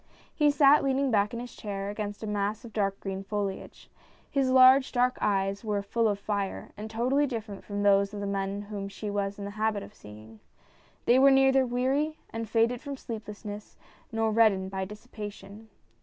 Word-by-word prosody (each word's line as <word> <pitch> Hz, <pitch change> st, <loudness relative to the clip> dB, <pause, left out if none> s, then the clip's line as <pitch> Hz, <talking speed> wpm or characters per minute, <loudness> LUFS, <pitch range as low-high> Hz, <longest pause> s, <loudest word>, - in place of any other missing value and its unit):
He 295 Hz, -2 st, +3 dB
sat 285 Hz, 0 st, +5 dB
leaning 270 Hz, 0 st, +1 dB
back 205 Hz, -1 st, +2 dB
in 235 Hz, -, -5 dB
his 245 Hz, 0 st, -8 dB
chair 200 Hz, -1 st, -4 dB
against 205 Hz, 0 st, -5 dB
a -, -, -2 dB
mass 210 Hz, +2 st, -2 dB
of 225 Hz, -, -11 dB
dark 195 Hz, -2 st, -1 dB
green 195 Hz, 0 st, -5 dB
foliage. 200 Hz, -1 st, -5 dB, 0.4 s
His 270 Hz, -2 st, +1 dB
large 260 Hz, +1 st, +6 dB
dark 250 Hz, 0 st, +1 dB
eyes 195 Hz, 0 st, 0 dB
were 205 Hz, -2 st, -1 dB
full 230 Hz, +3 st, +1 dB
of 205 Hz, -2 st, 0 dB
fire, 200 Hz, -1 st, -3 dB
and 215 Hz, +1 st, -7 dB
totally 255 Hz, +6 st, +1 dB
different 220 Hz, -5 st, -6 dB
from 205 Hz, 0 st, -4 dB
those 200 Hz, 0 st, +4 dB
of 210 Hz, -, -6 dB
the 200 Hz, -, -3 dB
men 200 Hz, 0 st, -2 dB
whom 200 Hz, -1 st, -6 dB
she 205 Hz, +1 st, -6 dB
was 200 Hz, -1 st, -2 dB
in 200 Hz, -, -6 dB
the 200 Hz, -, -5 dB
habit 215 Hz, -2 st, 0 dB
of -, -, -12 dB
seeing. 110 Hz, -, -13 dB, 0.7 s
They 245 Hz, +2 st, +5 dB
were 275 Hz, +1 st, +7 dB
neither 270 Hz, -1 st, +4 dB
weary 270 Hz, +6 st, 0 dB
and 225 Hz, -1 st, -5 dB
faded 230 Hz, +1 st, +2 dB
from 285 Hz, -2 st, -6 dB
sleeplessness, 210 Hz, -3 st, -8 dB, 0.3 s
nor 225 Hz, -1 st, 0 dB
red 225 Hz, 0 st, +5 dB
dened 190 Hz, 0 st, -5 dB
by 190 Hz, -1 st, -2 dB
dissipation. 210 Hz, 0 st, -10 dB
210 Hz, 190 wpm, -28 LUFS, 200-245 Hz, 0.7 s, were